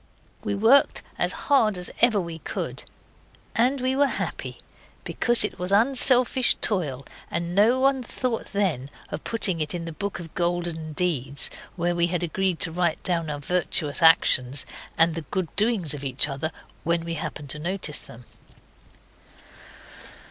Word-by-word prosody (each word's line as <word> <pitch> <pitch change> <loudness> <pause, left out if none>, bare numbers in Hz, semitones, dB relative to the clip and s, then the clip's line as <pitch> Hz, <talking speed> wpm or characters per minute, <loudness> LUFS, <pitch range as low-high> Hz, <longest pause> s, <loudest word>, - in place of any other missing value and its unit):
We 210 -2 -2
worked 225 +8 +4 0.2
as - - +2
hard 220 -9 +3
as 180 - -2
ever 235 -3 +5
we 170 -3 -5
could. - - -4 0.7
And 255 +4 +2
we 260 +1 0
were 285 +1 +3
happy, - - -4 0.5
because 240 -2 +2
it 210 - -4
was 180 +1 -2
unselfish 250 +2 +4
toil, 145 - -1 0.2
and 170 +1 -3
no 220 +7 +4
one 270 0 +2
thought 245 0 -3
then 175 -10 -1 0.2
of - - -5
putting 195 -7 -1
it 150 +2 -2
in 170 -1 -5
the 165 - -5
Book 200 +4 -5
of 165 -2 -10
Golden 170 -2 -2
Deeds, 140 -5 -1 0.2
where 175 0 0
we 170 0 +2
had 175 0 -2
agreed 185 +1 -1
to 165 - -1
write 170 -1 -1
down 170 -4 -1
our 145 - -3
virtuous 155 -1 0
actions 140 -5 +4 0.3
and 165 0 +4
the 165 - -4
good 185 -4 -3
doings 205 -7 +1
of 145 -1 -7
each 135 +1 +3
other, 145 +3 -3 0.3
when 170 0 0
we 170 0 -4
happen 150 -2 -5
to 150 - -3
notice 175 -2 -2
them. 120 +1 -14
175 Hz, 160 wpm, -25 LUFS, 160-215 Hz, 0.7 s, ever